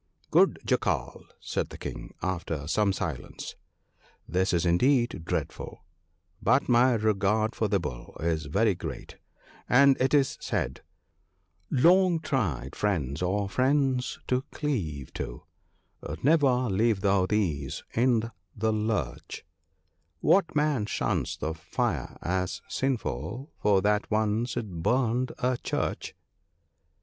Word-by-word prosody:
' -, -, -47 dB
Good -, -, +5 dB
Jackal,' -, -, -1 dB
said -, -, -3 dB
the -, -, -9 dB
King, -, -, -7 dB
after 85 Hz, -5 st, -2 dB
some 100 Hz, +6 st, +2 dB
silence; 80 Hz, -9 st, -5 dB, 0.4 s
' -, -, -45 dB, 0.3 s
this 95 Hz, +4 st, +1 dB
is 85 Hz, -1 st, +1 dB
indeed 120 Hz, -, +2 dB
dreadful; -, -, -4 dB, 0.6 s
but -, -, +3 dB
my 125 Hz, +1 st, +5 dB
regard 110 Hz, 0 st, +1 dB
for 110 Hz, -, 0 dB
the 100 Hz, -1 st, +2 dB
Bull 60 Hz, -8 st, -7 dB
is 80 Hz, -2 st, -1 dB
very 100 Hz, +7 st, +2 dB
great, 85 Hz, -, -7 dB, 0.5 s
and 140 Hz, +2 st, +6 dB
it 135 Hz, +3 st, +3 dB
is 140 Hz, -2 st, +2 dB
said, -, -, -2 dB, 0.3 s
— -, -, -45 dB
" 85 Hz, 0 st, -42 dB
Long 175 Hz, +5 st, +4 dB
tried 85 Hz, -, -2 dB
friends 80 Hz, -8 st, -1 dB
are 100 Hz, +3 st, 0 dB
friends 130 Hz, +2 st, +1 dB
to 125 Hz, 0 st, +1 dB
cleave 85 Hz, -, -3 dB
to -, -, -6 dB, 0.4 s
— 75 Hz, +2 st, -10 dB
never 135 Hz, -4 st, +4 dB
leave 105 Hz, 0 st, +2 dB
thou 95 Hz, -2 st, +3 dB
these 80 Hz, -10 st, -1 dB
i' 120 Hz, -1 st, +3 dB, 0.3 s
the 110 Hz, 0 st, +1 dB
lurch: 105 Hz, -, -3 dB, 0.7 s
What 190 Hz, -4 st, +3 dB
man 150 Hz, -8 st, +1 dB
shuns -, -, -1 dB
the 80 Hz, -, -2 dB
fire 80 Hz, -, -3 dB
as 90 Hz, +1 st, -2 dB
sinful 125 Hz, -, -3 dB
for 100 Hz, -3 st, +3 dB
that 105 Hz, 0 st, +1 dB
once 110 Hz, +3 st, 0 dB
it 100 Hz, -8 st, -4 dB
burned 125 Hz, +4 st, +1 dB
a 125 Hz, -1 st, 0 dB
church -, -, -3 dB
105 Hz, 130 wpm, -28 LUFS, 90-125 Hz, 0.7 s, and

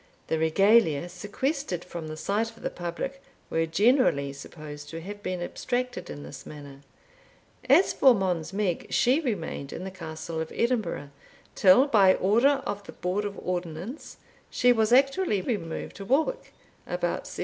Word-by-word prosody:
The 160 Hz, -, +1 dB
Regalia, 175 Hz, -1 st, +4 dB
sequestered 205 Hz, -, -3 dB
from 170 Hz, -3 st, -7 dB
the 155 Hz, 0 st, -6 dB
sight 210 Hz, +7 st, -1 dB
of -, -, -15 dB
the -, -, -2 dB
public, 175 Hz, +11 st, -5 dB, 0.3 s
were 165 Hz, 0 st, +1 dB
generally 180 Hz, -, +3 dB
supposed 145 Hz, +1 st, -10 dB
to 165 Hz, -, -6 dB
have 205 Hz, +4 st, -8 dB
been 185 Hz, -2 st, -3 dB
abstracted 245 Hz, +6 st, -3 dB
in 75 Hz, -1 st, -7 dB
this 75 Hz, -, -9 dB
manner. 140 Hz, -2 st, -11 dB, 0.9 s
As 315 Hz, +8 st, +5 dB
for 260 Hz, -3 st, +6 dB
Mons 180 Hz, -5 st, -1 dB
Meg, 195 Hz, -3 st, -1 dB
she 255 Hz, +5 st, +3 dB
remained 175 Hz, -, -3 dB
in -, -, -6 dB
the 190 Hz, -, -5 dB
Castle 165 Hz, -2 st, -6 dB
of 160 Hz, -, -5 dB
Edinburgh, 220 Hz, -, -1 dB, 0.4 s
till, 195 Hz, +8 st, +6 dB
by 200 Hz, -9 st, +5 dB
order 260 Hz, +8 st, +3 dB
of 205 Hz, -4 st, -4 dB
the -, -, -10 dB
Board 190 Hz, +4 st, -2 dB
of 200 Hz, -1 st, -5 dB
Ordnance, 180 Hz, -, -5 dB, 0.3 s
she 245 Hz, 0 st, +4 dB
was 220 Hz, -1 st, +1 dB
actually 275 Hz, -, +3 dB
removed 180 Hz, -5 st, -4 dB
to 195 Hz, -, -7 dB
Woolwich 310 Hz, -, 0 dB, 0.4 s
about -, -, -2 dB
1757. -, -, -8 dB
190 Hz, 160 wpm, -27 LUFS, 160-245 Hz, 0.9 s, for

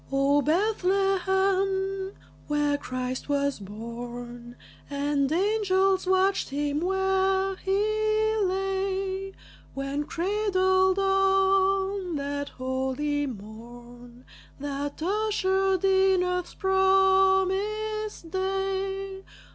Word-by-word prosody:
O 275 Hz, +1 st, +3 dB
Bethlehem, 385 Hz, +2 st, +1 dB, 0.3 s
where 295 Hz, -1 st, +1 dB
Christ 255 Hz, -1 st, -4 dB
was 280 Hz, -2 st, 0 dB
born 240 Hz, +3 st, -8 dB, 0.3 s
And 285 Hz, 0 st, 0 dB
angels 385 Hz, 0 st, +2 dB
watched 380 Hz, +1 st, +2 dB
him 290 Hz, +1 st, -1 dB
where 385 Hz, +1 st, +1 dB
he 430 Hz, +2 st, +1 dB
lay, 385 Hz, 0 st, -2 dB, 0.4 s
When 275 Hz, +2 st, -3 dB
cradled 375 Hz, +1 st, +1 dB
on 390 Hz, -1 st, +2 dB
that 285 Hz, 0 st, -3 dB
holy 265 Hz, +3 st, -2 dB
morn 240 Hz, +2 st, -11 dB, 0.3 s
That 285 Hz, +2 st, -4 dB
ushered 385 Hz, -1 st, +1 dB
in 380 Hz, -1 st, +4 dB
earth's 360 Hz, -1 st, -2 dB
promised 385 Hz, +1 st, +2 dB
day! 385 Hz, 0 st, -2 dB
380 Hz, 75 wpm, -26 LUFS, 285-390 Hz, 0.4 s, in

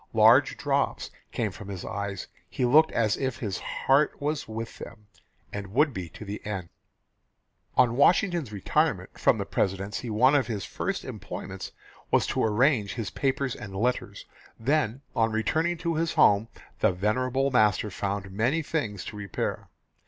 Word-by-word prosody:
Large -, -, +6 dB
drops -, -, -1 dB, 0.2 s
came 110 Hz, -4 st, -1 dB
from 100 Hz, +1 st, -10 dB
his 95 Hz, -3 st, -6 dB
eyes. 100 Hz, -1 st, -4 dB, 0.2 s
He 125 Hz, +8 st, -1 dB
looked 155 Hz, +6 st, +5 dB
as 110 Hz, -2 st, +1 dB
if 130 Hz, -2 st, -2 dB
his 100 Hz, -6 st, -3 dB
heart 140 Hz, +3 st, +1 dB
was 150 Hz, +1 st, -2 dB
with 115 Hz, +1 st, -6 dB
them, 105 Hz, -, -10 dB, 0.5 s
and 100 Hz, -1 st, -4 dB
would 150 Hz, 0 st, +4 dB
be 90 Hz, -5 st, -5 dB
to 110 Hz, -, -10 dB
the 105 Hz, +1 st, -6 dB
end." 95 Hz, -5 st, -4 dB, 1.1 s
On 120 Hz, -2 st, +4 dB
Washington's 170 Hz, -, +3 dB
retirement 100 Hz, -3 st, 0 dB
from -, -, +4 dB
the -, -, -3 dB
Presidency 100 Hz, +5 st, -2 dB
one 125 Hz, +6 st, +4 dB
of 140 Hz, -3 st, +3 dB
his 105 Hz, -5 st, -3 dB
first -, -, -3 dB
employments -, -, -7 dB, 0.4 s
was -, -, +3 dB
to -, -, 0 dB
arrange 110 Hz, -1 st, +2 dB
his 115 Hz, -4 st, -4 dB
papers 135 Hz, -1 st, -1 dB
and 100 Hz, -2 st, -8 dB
letters. 125 Hz, +6 st, -1 dB, 0.3 s
Then 135 Hz, 0 st, 0 dB
on 115 Hz, 0 st, +2 dB
returning 160 Hz, +11 st, 0 dB
to 170 Hz, 0 st, -1 dB
his 165 Hz, +1 st, 0 dB
home 105 Hz, +2 st, +5 dB, 0.3 s
the 110 Hz, -, +4 dB
venerable 130 Hz, +8 st, 0 dB
master 105 Hz, -3 st, +3 dB
found 100 Hz, 0 st, -3 dB
many 125 Hz, +11 st, +1 dB
things 110 Hz, -, -3 dB
to -, -, -7 dB
repair. 100 Hz, -3 st, -4 dB
115 Hz, 160 wpm, -27 LUFS, 100-135 Hz, 1.1 s, Large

